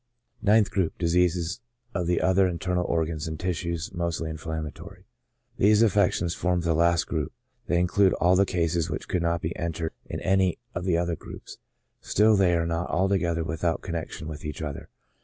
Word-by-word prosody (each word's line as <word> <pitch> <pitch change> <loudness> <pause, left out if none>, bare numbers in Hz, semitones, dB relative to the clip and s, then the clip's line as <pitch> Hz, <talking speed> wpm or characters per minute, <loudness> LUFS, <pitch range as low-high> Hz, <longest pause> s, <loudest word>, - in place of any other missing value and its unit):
Ninth 105 0 +4
Group: 95 -5 0
Diseases 90 +3 +1 0.3
of 90 -1 -1
other 95 +2 +3
Internal 90 0 -1
Organs 80 -1 -1
and 80 -1 -4
Tissues^ 85 -1 -3
mostly 85 -2 -2
Inflammatory. 80 +4 -7 0.3
— 125 0 -42
These 105 +2 +5
affections 95 -4 +2
form 90 0 0
the 85 -1 +1
last 85 +2 +3
group: 80 -4 -2 0.4
they 85 - +2
include 95 +2 +3
all 90 +1 +3
the 95 - +5
cases 85 -2 0
which - - -4
could 90 - 0
not 85 0 0
be 80 - -2
enter 85 -1 -3 0.2
ed - - -8
in - - -3
any 95 -2 +2 0.2
of 90 +1 -4
the 90 -3 +2
other 85 0 0
groups; - - -11 0.4
still 105 +1 +3
they 95 -3 +3
are 85 0 +1
not 85 +1 -2
altoge 95 -2 +1
ther 85 - -1
without 80 +1 -1
connection 85 -2 -5
with 75 -2 -7
each 75 +1 -5
other. 75 -2 -6
85 Hz, 180 wpm, -26 LUFS, 85-95 Hz, 0.4 s, These